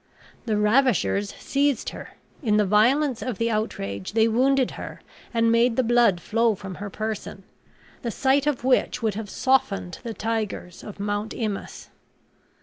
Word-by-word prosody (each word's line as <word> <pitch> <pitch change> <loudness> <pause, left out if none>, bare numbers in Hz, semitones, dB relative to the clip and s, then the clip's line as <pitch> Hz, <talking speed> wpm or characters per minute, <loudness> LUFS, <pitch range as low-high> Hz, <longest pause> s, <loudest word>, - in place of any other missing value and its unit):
The 215 -2 +1
ravishers 210 - +2
seized 280 -3 0
her; - - -10 0.3
in 215 -6 +2
the 210 - +3
violence 245 +6 +3
of 250 -6 -3
the 230 0 0
outrage 100 - -3
they 225 0 +4
wounded 260 +3 +2
her, - - -8 0.3
and 230 -1 +2
made 230 +1 +3
the 260 - +2
blood 235 -6 +4
flow 225 +5 +1
from 190 -1 -8
a 205 +1 -6
person, 215 -2 -5 0.6
the 235 - -3
sight 270 +5 +2
of 285 -5 0
which 250 -1 +1
would 220 -2 +1
have 210 0 -6
softened 200 -9 0
the 230 -2 -6
tigers 215 -5 -3
of 210 - -9
Mount 205 +1 -2
Imaus. 215 -4 -5
225 Hz, 155 wpm, -24 LUFS, 205-250 Hz, 0.6 s, they